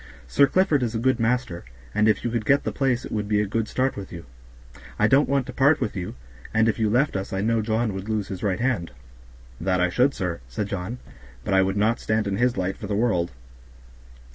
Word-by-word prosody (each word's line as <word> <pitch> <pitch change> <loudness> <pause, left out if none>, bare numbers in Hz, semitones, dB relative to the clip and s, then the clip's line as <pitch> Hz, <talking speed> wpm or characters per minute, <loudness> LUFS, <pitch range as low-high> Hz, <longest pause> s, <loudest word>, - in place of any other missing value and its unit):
Sir 140 - +4
Clifford 170 -3 +2
is 120 -2 -1
a - - +1
good 130 +2 +1
master, 115 -6 0 0.3
and 105 - +3
if 110 - +2
you 120 - -1
could 115 -2 -1
get 140 +6 +3
the - - -2
place 130 -3 0
it - - -9
would 105 -1 -2
be 105 0 +2
a 105 - +1
good 110 +2 -1
start 130 +1 0
for 100 - -7
you. 85 -1 -9 0.7
I 105 - +3
don't 135 +4 +4
want 140 -2 +1
to 130 - -8
part 140 +4 +4
with 105 - -2
you, 90 -7 -5 0.4
and 110 0 +4
if 115 - 0
you 110 -1 +2
left 125 +4 +2
us 95 0 -3
I 95 - -1
know 115 +1 +1
John 110 0 0
would 95 +3 -6
lose 105 -3 -1
his 95 -2 -6
right 95 -3 0
hand." 120 -9 0 0.7
"That 90 0 0
I 90 0 +2
should, 125 +9 +2
sir," 90 -3 -3
said 100 +12 -4
John, 100 +5 -4 0.5
"but - - -2
I 95 - +5
would 95 +1 0
not 110 +3 +2
stand 110 0 0
in 100 -1 -1
his 125 -1 +1
light 95 +1 -1
for 105 - -7
the 100 - -1
world." 95 -6 +1
110 Hz, 245 wpm, -24 LUFS, 95-125 Hz, 0.7 s, I